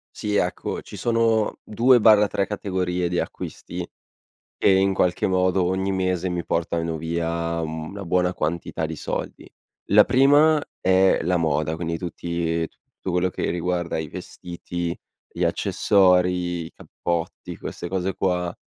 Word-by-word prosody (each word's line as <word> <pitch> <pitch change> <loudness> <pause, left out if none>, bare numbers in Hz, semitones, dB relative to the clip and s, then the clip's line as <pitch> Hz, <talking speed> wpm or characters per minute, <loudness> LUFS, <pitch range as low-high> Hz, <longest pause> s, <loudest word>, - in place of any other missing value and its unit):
Sì 105 -1 -2
ecco, 90 -3 -1
ci - - -11
sono 115 -2 +1
2/3 110 -4 +4
categorie 90 -3 -2
di 90 0 -1
acquisti - - -6 0.7
che - - +3
in 95 0 +4
qualche 90 -2 +1
modo 95 0 +2
ogni 95 +2 0
mese 95 -1 0
mi 90 -1 -3
portano 85 -1 -1
via 85 +1 -2
una 80 +5 -5
buona 90 +1 +1
quantità 80 0 -2
di 80 0 -3
soldi. - - -5 0.4
La 105 +1 +6
prima 145 +4 +5 0.2
è 95 +1 +4
la 90 +2 +1
moda, 80 -1 0
quindi 85 0 -3
tutti 85 -1 -2
tutto - - -10
quello 90 +1 +1
che - - -3
riguarda 85 0 -2
i 80 -1 -3
vestiti, 85 +2 -6 0.3
gli - - -3
accessori, 90 -3 +2
i - - -11
cappotti, 85 -1 -4
queste 85 - -6
cose 95 +1 -2
qua, 90 -2 -1
90 Hz, 135 wpm, -23 LUFS, 85-95 Hz, 0.7 s, La